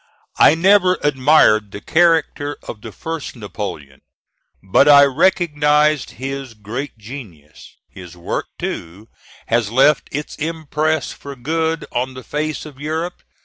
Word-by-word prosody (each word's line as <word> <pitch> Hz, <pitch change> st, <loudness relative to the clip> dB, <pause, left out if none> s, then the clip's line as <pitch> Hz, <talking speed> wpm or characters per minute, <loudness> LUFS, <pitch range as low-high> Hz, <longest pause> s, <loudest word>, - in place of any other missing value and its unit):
I 150 Hz, -, +7 dB
never 185 Hz, +1 st, +4 dB
admired 130 Hz, -7 st, +4 dB
the 100 Hz, -, -8 dB
character 160 Hz, -, +1 dB
of 105 Hz, -, -7 dB
the 110 Hz, -, -8 dB
first 160 Hz, +5 st, -6 dB
Napoleon; 90 Hz, -, -7 dB, 0.6 s
but 95 Hz, +9 st, +4 dB
I 140 Hz, -1 st, +9 dB
recognize 150 Hz, -1 st, +2 dB
his 135 Hz, -1 st, -6 dB
great 115 Hz, +7 st, -6 dB
genius. 105 Hz, -, -12 dB
His 90 Hz, -1 st, -12 dB
work, 85 Hz, -, -4 dB
too, 95 Hz, +7 st, -6 dB, 0.4 s
has 115 Hz, -2 st, +1 dB
left 135 Hz, +6 st, +3 dB
its 150 Hz, +2 st, -5 dB
impress 155 Hz, 0 st, -2 dB
for 140 Hz, -1 st, -10 dB
good 160 Hz, +4 st, -2 dB
on 130 Hz, +2 st, -2 dB
the 130 Hz, -, -9 dB
face 150 Hz, +6 st, -3 dB
of 145 Hz, -3 st, -12 dB
Europe. 160 Hz, +4 st, -4 dB
140 Hz, 130 wpm, -19 LUFS, 110-155 Hz, 0.6 s, I